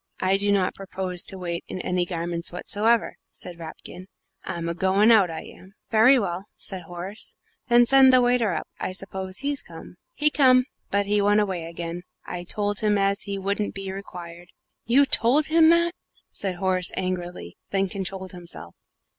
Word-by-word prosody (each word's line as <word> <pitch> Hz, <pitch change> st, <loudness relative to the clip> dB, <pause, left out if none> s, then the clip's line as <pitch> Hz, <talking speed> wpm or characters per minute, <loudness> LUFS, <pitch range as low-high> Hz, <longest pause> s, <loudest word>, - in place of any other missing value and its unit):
"I 190 Hz, +1 st, +2 dB
do 205 Hz, +1 st, +1 dB
not 195 Hz, -2 st, +2 dB
propose 185 Hz, -2 st, -2 dB
to 190 Hz, -, -4 dB
wait 170 Hz, -2 st, -4 dB
in -, -, -6 dB
any 180 Hz, -1 st, -1 dB
garments 170 Hz, -1 st, -2 dB
whatsoever," 220 Hz, +6 st, +1 dB
said 175 Hz, -2 st, -7 dB
Rapkin; 175 Hz, +3 st, -10 dB, 0.4 s
"I'm 170 Hz, -1 st, -4 dB
a 170 Hz, -, -1 dB
goin' 190 Hz, +5 st, +3 dB
out, 205 Hz, -6 st, +5 dB
I 160 Hz, -, -5 dB
am." 190 Hz, +2 st, -15 dB, 0.2 s
"Very 230 Hz, +5 st, +6 dB
well," 190 Hz, -4 st, -2 dB
said 190 Hz, -3 st, -6 dB
Horace; 175 Hz, +4 st, -7 dB, 0.3 s
"then 240 Hz, -1 st, +6 dB
send 265 Hz, +1 st, +7 dB
the 255 Hz, -, +6 dB
waiter 245 Hz, -4 st, +2 dB
up -, -, -3 dB
I 185 Hz, -, -3 dB
suppose 190 Hz, 0 st, -4 dB
he's 280 Hz, +2 st, -2 dB
come?" -, -, -12 dB, 0.2 s
"He 300 Hz, 0 st, +3 dB
come 255 Hz, -3 st, +5 dB, 0.2 s
but 200 Hz, 0 st, +1 dB
he 205 Hz, +1 st, +2 dB
went 205 Hz, +1 st, +4 dB
away 190 Hz, -5 st, -1 dB
again 170 Hz, +1 st, -6 dB, 0.2 s
I 175 Hz, 0 st, -6 dB
told 205 Hz, +2 st, -2 dB
him 210 Hz, -1 st, +2 dB
as 200 Hz, +2 st, +1 dB
he 200 Hz, -3 st, -4 dB
wouldn't 200 Hz, +2 st, -2 dB
be 195 Hz, -1 st, -5 dB
required." 175 Hz, -3 st, -9 dB, 0.4 s
"You 265 Hz, +5 st, +5 dB
told 270 Hz, +3 st, +4 dB
him 325 Hz, -1 st, +7 dB
that!" 340 Hz, 0 st, +3 dB, 0.6 s
Horace 185 Hz, -1 st, 0 dB
said -, -, -7 dB
angrily, 180 Hz, -, -4 dB
and 195 Hz, -1 st, +2 dB
then -, -, 0 dB
controlled 190 Hz, 0 st, -5 dB
himself. 175 Hz, -2 st, -7 dB
195 Hz, 180 wpm, -24 LUFS, 180-220 Hz, 0.6 s, send